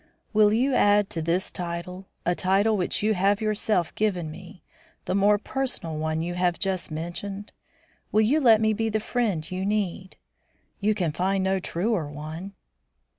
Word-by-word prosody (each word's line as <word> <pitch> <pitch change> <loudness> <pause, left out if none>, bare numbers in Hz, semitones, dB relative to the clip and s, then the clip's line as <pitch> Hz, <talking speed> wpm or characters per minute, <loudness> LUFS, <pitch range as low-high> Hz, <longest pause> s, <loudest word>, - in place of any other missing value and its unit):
Will 210 -1 +5
you 255 +5 +2
add 205 -3 +4
to 165 - -3
this 170 +4 0
title 180 +2 -5 0.2
a 175 - +3
title 195 +5 +2
which 185 +1 -1
you 215 +1 +3
have 200 +1 +2
yourself 215 -4 0
given 180 -7 -1
me, 180 +2 -12 0.4
the - - -1
more 200 +2 +4
personal 245 -8 -3
one 155 +1 -1
you 175 +1 -3
have 180 -1 +1
just 190 -2 -2
mentioned? 175 +6 -5 0.6
Will 215 - +4
you 255 +9 +3
let 230 -6 +6
me 220 0 +3
be 225 +1 -1
the 220 0 0
friend 215 -8 -1
you 185 +1 -2
need? 195 -2 -2 0.6
You 215 +1 +1
can 175 -6 0
find 190 +4 0
no 190 0 +1
truer 180 -2 -1
one." 155 +6 -7
195 Hz, 170 wpm, -26 LUFS, 175-215 Hz, 0.6 s, let